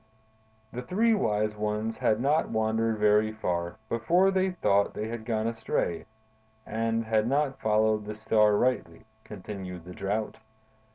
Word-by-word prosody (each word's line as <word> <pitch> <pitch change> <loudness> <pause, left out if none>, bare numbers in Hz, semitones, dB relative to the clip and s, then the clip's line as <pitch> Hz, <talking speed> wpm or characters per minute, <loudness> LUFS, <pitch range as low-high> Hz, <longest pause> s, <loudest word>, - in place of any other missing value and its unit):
"The 125 - -4
three 215 - +2
wise 105 - 0
ones 105 +1 -2
had 110 - +1
not 145 +5 +1
wandered 110 0 0
very 105 +1 +3
far 85 -5 -3
before 175 - +2
they 190 0 +1
thought 100 - +1
they 110 +1 -3
had 115 -1 -6
gone 110 -2 -1
astray 110 -6 -2 0.6
and 115 0 -1
had 110 0 +1
not 140 +1 0
followed 110 0 +2
the 105 0 -6
Star 105 -1 +3
rightly," 115 -10 -1 0.2
continued 95 -3 -8
the 90 - -9
Drought. 105 +4 -3
110 Hz, 140 wpm, -28 LUFS, 105-115 Hz, 0.6 s, very